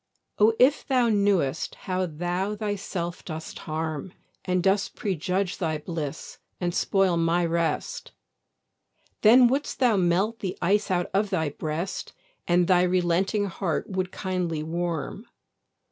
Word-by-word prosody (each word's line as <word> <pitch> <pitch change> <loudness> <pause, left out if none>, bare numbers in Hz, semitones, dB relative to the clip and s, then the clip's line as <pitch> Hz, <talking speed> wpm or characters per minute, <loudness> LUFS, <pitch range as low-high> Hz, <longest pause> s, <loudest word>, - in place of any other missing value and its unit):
O 215 +2 +6
if 265 +4 +4
thou 250 -3 +3
knew'st 200 -10 +1
how 185 0 -2
thou 175 +5 -2
thyself 200 -4 -4
dost 160 -1 -7
harm, 155 +2 -3 0.3
And 180 -1 0
dost 195 +1 +1
prejudge 185 0 -1
thy 160 -3 0
bliss, 155 -2 -6 0.2
and 175 -1 -1
spoil 190 -2 +2
my 170 +1 +2
rest; 170 - -2 1.1
Then 240 +3 +7
would'st 275 +4 -1
thou 245 -5 +3
melt 190 +5 +1
the 185 -2 -4
ice 200 +4 +1
out 180 -1 0
of 200 +1 +1
thy 160 -6 0
breast, 155 +5 -4 0.3
And 175 0 +4
thy 180 -2 +5
relenting 180 +3 +1
heart 190 -1 -3
would 185 -1 -2
kindly 180 -5 -2
warm. 170 +5 -3
180 Hz, 130 wpm, -26 LUFS, 170-200 Hz, 1.1 s, Then